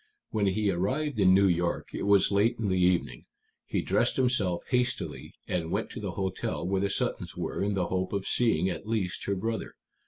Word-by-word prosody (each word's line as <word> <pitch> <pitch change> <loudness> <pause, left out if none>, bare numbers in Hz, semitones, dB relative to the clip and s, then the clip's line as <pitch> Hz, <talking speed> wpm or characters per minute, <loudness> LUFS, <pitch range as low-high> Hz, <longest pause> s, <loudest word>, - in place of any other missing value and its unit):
When 105 -2 +1
he 100 +1 +1
arrived 125 - -1
in 95 -1 +6
New 100 +1 +5
York 85 -1 0
it - - -3
was 100 -1 +5
late 100 +3 +3
in 110 -3 -1
the 95 -1 +1
evening. 90 -1 +1 0.4
He - - -1
dressed - - +2
himself 125 -9 +1
hastily, 125 -1 -1
and 85 -3 -2
went - - -2
to - - -7
the - - -4
hotel 95 -3 -3
where 95 0 0
the 100 - +1
Suttons - - -2
were, - - -3
in 100 +1 0
the 90 -2 +1
hope 95 +1 -2
of 100 -1 -2
seeing 105 -8 +2
at 95 +2 -4
least 105 -5 -2
her 100 - 0
brother. 110 +4 -3
100 Hz, 200 wpm, -28 LUFS, 90-110 Hz, 0.4 s, in